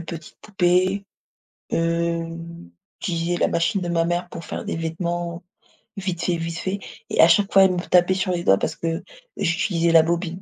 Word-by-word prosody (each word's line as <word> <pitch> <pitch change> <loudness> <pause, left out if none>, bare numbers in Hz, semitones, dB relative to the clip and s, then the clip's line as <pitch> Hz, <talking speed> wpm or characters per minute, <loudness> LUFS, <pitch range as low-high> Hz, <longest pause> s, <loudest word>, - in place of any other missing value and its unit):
petites 165 -1 -8
poupées, 190 0 +1 0.7
hem, 165 - -2 0.3
j'utilisais 170 0 -1
la - - +2
machine 170 +3 0
de 175 - -3
ma 165 -1 +1
mère 175 +1 -1
pour 170 - -8
faire - - -6
des - - -3
vêtements, 170 +1 -3 0.5
vite 185 -3 -3
fait, 175 -1 +1
vite 165 0 -4
fait 190 +3 -3 0.3
et - - +4
à 160 - +8
chaque 195 +4 +3
fois 195 - +8
elle 185 - +2
me 180 - -1
tapait 180 +1 +3
sur 185 0 -1
les 175 -1 -1
doigts 95 - +5
parce - - -2
que 165 0 -3 0.3
j'utilisais 170 -1 +1
la 165 -1 +8
bobine. 170 +2 -2
170 Hz, 185 wpm, -23 LUFS, 165-180 Hz, 0.7 s, à